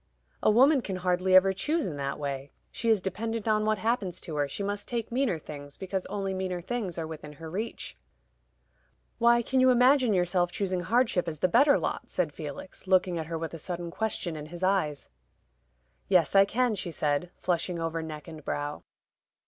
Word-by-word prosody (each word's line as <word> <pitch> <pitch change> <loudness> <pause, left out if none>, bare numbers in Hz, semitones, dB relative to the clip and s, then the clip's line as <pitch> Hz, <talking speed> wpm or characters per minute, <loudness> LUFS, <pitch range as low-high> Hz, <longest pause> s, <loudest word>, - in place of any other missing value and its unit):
"A - - +4
woman 265 +6 +5
can 195 -5 -4
hardly 185 +1 +2
ever 190 +1 +7
choose 295 - 0
in 165 - -4
that 140 0 -3
way; 140 -1 -4 0.2
she 230 - -2
is 215 -4 +3
dependent 225 +3 -3
on 215 -1 +2
what 215 0 +2
happens 220 -5 -1
to 160 - -6
her. 145 -1 +1
She 170 +8 -4
must 205 +1 -3
take 235 -2 -3
meaner 245 -7 +1
things, 145 -2 -10
because 190 -1 -3
only 195 -1 -3
meaner 185 -1 -2
things 195 -2 -4
are 165 - -2
within 155 -2 -8
her 160 +2 -9
reach." 215 +6 -4 1.2
"Why, 235 0 +5
can 260 +3 +1
you 255 0 +6
imagine 255 0 +5
yourself 175 0 +1
choosing 190 -2 -1
hardship 210 -1 +1
as 155 -2 -3
the 185 - +2
better 280 - +5
lot?" - - -3
said 175 -5 -1
Felix, 155 +5 -8
looking 185 -2 +3
at 160 - -4
her 165 0 -3
with 165 0 -5
a 165 - -6
sudden 175 +1 -5
question 195 -5 -2
in 150 -1 -7
his 175 +3 -8
eyes. 155 - 0 1.0
"Yes, - - +3
I 195 0 +8
can," 245 +3 +1
she 185 -3 -3
said, 150 +1 -1
flushing 175 0 -1
over 165 0 -2
neck 155 -1 -7
and 160 -2 -9
brow. 145 +1 -3
185 Hz, 195 wpm, -28 LUFS, 165-220 Hz, 1.2 s, I